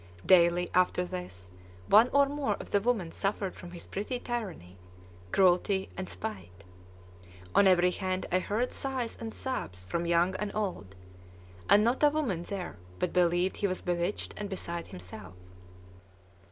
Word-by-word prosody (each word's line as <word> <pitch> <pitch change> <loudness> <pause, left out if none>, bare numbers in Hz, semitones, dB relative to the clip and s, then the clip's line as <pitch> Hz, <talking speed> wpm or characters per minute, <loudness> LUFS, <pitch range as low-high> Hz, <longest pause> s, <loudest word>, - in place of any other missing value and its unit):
Daily, 175 -1 +5
after 180 0 +3
this, 90 - -7 0.3
one 220 - +6
or 280 0 +5
more 275 -6 -1
of - - -10
the 200 - +3
women 210 -7 0
suffered 195 -1 -2
from 175 - -10
his 175 -1 -8
petty 215 +6 -3
tyranny, 185 - -5 0.5
cruelty, 190 - +3
and 90 -1 -5
spite. 90 0 -7 0.9
On 200 - +6
every 180 -1 +5
hand 185 0 -2
I 185 - +3
heard 215 +7 -1
sighs 260 -4 -3
and 225 -1 -4
sobs 90 - -4
from 170 - -2
young 170 +2 +3
and 210 -1 -3
old; 185 - -3 0.7
and 210 - +7
not 240 +3 +1
a 295 - +7
woman 280 - -1
there 180 - -5 0.2
but - - -1
believed 175 +1 +2
he 200 - +1
was 185 -1 -3
bewitched 175 +2 -2
and 205 -1 -4
beside 170 -3 -4
himself. 90 +1 -10
185 Hz, 155 wpm, -30 LUFS, 170-210 Hz, 0.9 s, and